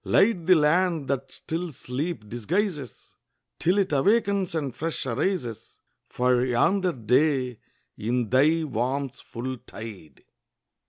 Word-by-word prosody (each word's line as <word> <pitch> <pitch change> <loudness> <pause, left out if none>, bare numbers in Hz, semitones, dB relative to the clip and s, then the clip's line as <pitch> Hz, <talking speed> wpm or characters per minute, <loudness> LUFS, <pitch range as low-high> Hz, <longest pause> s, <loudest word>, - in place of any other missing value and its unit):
Light 195 -6 +3
the 185 - +7
land 165 0 +2
that 135 -1 -2
still 170 +1 -4
sleep 135 -1 -4
disguises 145 - -3 0.4
Till 180 +4 +2
it 195 -4 +1
awakens 195 +3 +2
and 140 -6 -2
fresh 160 +2 -3
arises 130 - -2 0.3
For 125 0 +2
yonder 180 +10 +2
day 125 0 +1 0.4
in 120 +1 -1
thy 155 +5 +4
warmth's 135 0 -2
full 130 +2 -5
tide! 105 -12 -10
140 Hz, 115 wpm, -26 LUFS, 125-175 Hz, 0.4 s, the